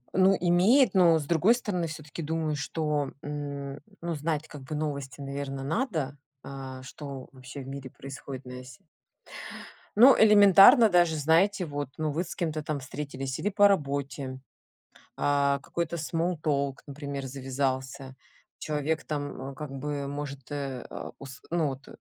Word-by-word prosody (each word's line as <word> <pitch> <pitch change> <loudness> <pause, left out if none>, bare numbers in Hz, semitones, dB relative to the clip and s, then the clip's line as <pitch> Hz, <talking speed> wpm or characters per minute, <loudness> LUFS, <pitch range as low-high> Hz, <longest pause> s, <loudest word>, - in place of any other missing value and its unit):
Ну 190 +1 +5
имеет, 190 +8 +4
но 170 -4 +6
с 150 - -4
другой 175 +9 +4
стороны, 180 -8 -2
всё-таки 155 +1 -7
думаю, 155 -1 -1
что, 150 -2 -1
м, 140 -1 -5 0.2
ну, 170 0 -2
знать 155 0 -2
как 145 -3 -10
бы 140 +4 -6
новости, 140 -4 -4
наверно, 135 -1 -4
надо, 155 - -1 0.3
а, 130 -1 -8
что 140 0 -8
вообще 130 +1 -9
в 130 - -9
мире 135 -1 -7
происходит 135 0 -8
на 125 0 -8
сь 125 -1 -12 1.2
Ну, 255 +4 +9
элементарно 210 +3 +8
даже, 175 -3 +4
знаете, 170 +6 +3
вот, 145 -2 -4
ну, 155 -1 -1
вы 165 +5 -1
с 175 - -8
кем-то 155 -3 -2
там 155 -3 -2
встретились 135 -1 -5
или 205 - 0
по 205 0 +6
работе, 140 -6 -1 0.8
а, 140 -1 +2
какой-то 170 +3 -3
small 165 +2 -1
talk, 140 -2 0
например, 140 -1 -5
завязался, 130 0 -3 0.5
человек 155 +1 -2
там, 145 -3 -4
м, 135 - -9
как 150 -2 -7
бы 140 +1 -3
может, 140 -1 -6
э, 135 -3 -4
а, - - -7
ус 135 -2 -10
ну 165 -2 +1
вот, 135 -1 -6
145 Hz, 155 wpm, -28 LUFS, 135-165 Hz, 1.2 s, Ну